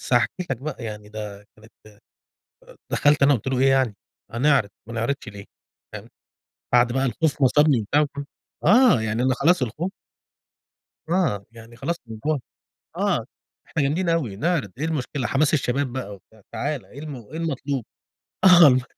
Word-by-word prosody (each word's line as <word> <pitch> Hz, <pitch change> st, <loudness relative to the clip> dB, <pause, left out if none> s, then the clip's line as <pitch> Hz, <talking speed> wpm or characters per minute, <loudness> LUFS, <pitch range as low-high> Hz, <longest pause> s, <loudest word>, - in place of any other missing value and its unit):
بس -, -, -7 dB
هاحكِ 120 Hz, -, +4 dB, 0.2 s
لك 135 Hz, -, 0 dB
بقى، 130 Hz, -2 st, -6 dB
يعني 105 Hz, -1 st, -7 dB
ده 105 Hz, -1 st, -8 dB
كانت 110 Hz, +1 st, -18 dB, 1.2 s
دخلت 145 Hz, 0 st, +3 dB
أنا 140 Hz, 0 st, +6 dB
قلت 115 Hz, -, -4 dB
له 130 Hz, -, 0 dB
إيه؟ 135 Hz, +1 st, +4 dB
يعني: 130 Hz, -5 st, +2 dB, 0.4 s
"هنعرض، 125 Hz, -3 st, +2 dB, 0.2 s
ما 115 Hz, -, -7 dB
نعرضش 115 Hz, +2 st, -2 dB
ليه؟" 100 Hz, -1 st, -9 dB, 0.5 s
فاهم؟ -, -, -9 dB, 0.7 s
بعد 120 Hz, 0 st, +4 dB
بقى 135 Hz, +1 st, +1 dB
الخوف 145 Hz, +3 st, -1 dB
ما 130 Hz, -, +7 dB
صابني، 150 Hz, -2 st, +4 dB
وبتاع 145 Hz, +9 st, +2 dB
فاهم؟ 145 Hz, -, -5 dB, 0.4 s
آه 225 Hz, -, +6 dB
يعني 110 Hz, +1 st, -1 dB
أنا 130 Hz, -, +3 dB
خلاص، 170 Hz, +4 st, +3 dB
الخوف 150 Hz, -, -2 dB, 1.2 s
آه، 160 Hz, -, +1 dB
يعني 115 Hz, 0 st, -14 dB
خلاص 170 Hz, +8 st, -2 dB
من 110 Hz, -1 st, -8 dB
جوه 150 Hz, -3 st, +1 dB, 0.6 s
آه -, -, 0 dB, 0.4 s
إحنا 155 Hz, -, -1 dB
جامدين 170 Hz, +6 st, 0 dB
أوي، 145 Hz, -12 st, 0 dB
نعرض 150 Hz, -, -1 dB
إيه 150 Hz, -, -2 dB
المشكلة؟ 145 Hz, -4 st, -2 dB
حماس 145 Hz, +3 st, +2 dB
الشباب 135 Hz, -2 st, 0 dB
بقى 125 Hz, -6 st, -5 dB
وبتاع. 110 Hz, +3 st, -22 dB
تعالَ، 145 Hz, -2 st, -3 dB
إيه 140 Hz, -, -12 dB
الم 150 Hz, -2 st, -6 dB
إيه 125 Hz, +6 st, -9 dB
المطلوب؟ 140 Hz, -6 st, -3 dB, 0.6 s
آه 180 Hz, -2 st, +9 dB
والله 130 Hz, -3 st, +5 dB
135 Hz, 170 wpm, -23 LUFS, 115-150 Hz, 1.2 s, آه